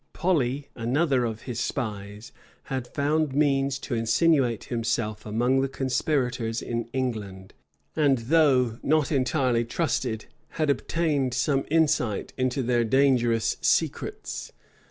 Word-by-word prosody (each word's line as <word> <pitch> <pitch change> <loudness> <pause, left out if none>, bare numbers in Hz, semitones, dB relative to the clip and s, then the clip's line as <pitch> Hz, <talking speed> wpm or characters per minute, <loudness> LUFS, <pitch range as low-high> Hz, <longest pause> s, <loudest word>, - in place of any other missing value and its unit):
Polly, 145 -6 0
another 130 +2 +1
of 110 -1 -5
his 120 -3 -5
spies, 105 -4 -4 0.3
had 130 -2 -4
found 145 +1 0
means 140 -2 +2
to 135 - -6
insinuate 120 - +2
himself 110 -2 -2
among 120 +5 +2
the 135 - +1
conspirators 125 -4 -1
in 115 -1 -3
England; 110 -7 -4 0.4
and, 145 -4 +3
though 125 -3 +2
not 155 0 +1
entirely 130 -3 +1
trusted, 120 -4 -2 0.3
had 155 -3 +2
obtained 140 -3 0
some 135 +1 +1
insight 150 -9 +1
into 130 0 -1
their 120 0 +2
dangerous 120 -2 +2
secrets. - - -1
130 Hz, 115 wpm, -26 LUFS, 115-140 Hz, 0.4 s, and